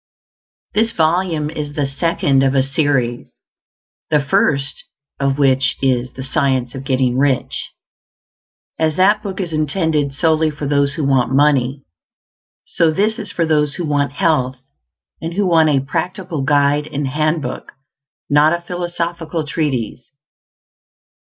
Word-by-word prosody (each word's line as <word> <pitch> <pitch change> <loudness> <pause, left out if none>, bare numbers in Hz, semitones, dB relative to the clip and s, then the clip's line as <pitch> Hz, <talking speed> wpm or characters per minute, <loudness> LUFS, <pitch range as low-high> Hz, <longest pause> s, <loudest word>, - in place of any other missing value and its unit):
This 225 +2 +1
volume 160 -2 0
is 150 -2 -5
the 145 - 0
second 140 -1 +1
of 135 0 +2
a 135 - +4
series, 135 -4 -1 0.7
the 150 - +3
first 140 0 0 0.3
of 140 0 0
which 135 -2 +2
is 130 -2 0
"THE 130 - -7
SCIENCE 130 -3 0
OF 135 - -7
GETTING 130 -2 +1
RICH." 135 -2 0 1.1
As 155 -1 +1
that 205 +4 +3
book 195 -2 -6
is 175 -4 -3
intended 155 -1 0
solely 160 +2 +2
for 150 -1 -6
those 140 0 +1
who 155 - -2
want 135 -3 +2
money, 140 -2 +2 0.8
so 165 - +1
this 210 +8 0
is 200 - -6
for 170 -4 0
those 150 -2 +1
who 175 - -3
want 145 -2 0
health, 145 -7 +1 0.6
and 165 +1 -4
who 205 0 +1
want 165 -3 +4
a 140 -3 +2
practical 175 +1 -3
guide 145 +1 +2
and 145 -2 -3
handbook, 155 +3 -2 0.5
not 150 +2 +4
a 170 - -2
philosophical 170 -2 -3
treatise. 140 -7 -3
150 Hz, 140 wpm, -18 LUFS, 135-165 Hz, 1.1 s, a